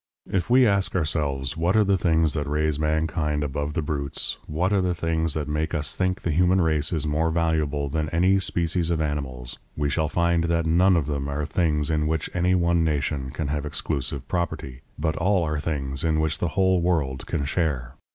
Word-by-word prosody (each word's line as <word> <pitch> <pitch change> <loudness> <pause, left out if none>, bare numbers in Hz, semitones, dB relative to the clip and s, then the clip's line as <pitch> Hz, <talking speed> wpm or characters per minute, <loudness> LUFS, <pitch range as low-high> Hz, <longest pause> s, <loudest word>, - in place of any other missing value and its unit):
If 95 +2 0
we 125 +1 +6
ask 100 -4 +1
ourselves 75 -4 -1
what 85 +4 +1
are 110 - +6
the 100 -1 +2
things 80 -4 +2
that 75 -2 -2
raise 75 0 0
mankind 75 -1 0
above 75 +1 -3
the 80 -1 -1
brutes, 70 -2 -3
what 90 +6 0
are 100 - +3
the 90 -1 0
things 80 -2 0
that 75 -2 -2
make 80 +2 -1
us 75 -1 -1
think 95 0 0
the 85 - -1
human 90 +4 +3
race 80 -3 +1
more 80 +2 +1
valuable 80 -3 0
than 75 +2 -2
any 90 +4 +3
species 85 -2 0
of 85 -2 0
animals, 70 -5 -3 0.2
we 75 -1 0
shall 80 +1 +1
find 85 0 +1
that 85 0 +1
none 90 +3 +4
of 80 - 0
them 70 -1 -2
are 75 +1 -2
things 75 -1 0
in 75 -1 +1
which 80 -1 -2
any 90 +1 +2
one 85 -1 +2
nation 70 -3 -1
can 75 +2 -4
have 75 -1 -1
exclusive 70 -2 -3
property, 75 -7 -3 0.2
but 80 +1 -1
all 95 0 +2
are 75 -1 -1
things 70 -4 -1
in 80 -1 +1
which 80 -1 -1
the 85 - 0
whole 95 -2 +3
world 75 -7 -1
can 75 -4 -1
share. 70 -6 -1
80 Hz, 200 wpm, -25 LUFS, 75-85 Hz, 0.2 s, we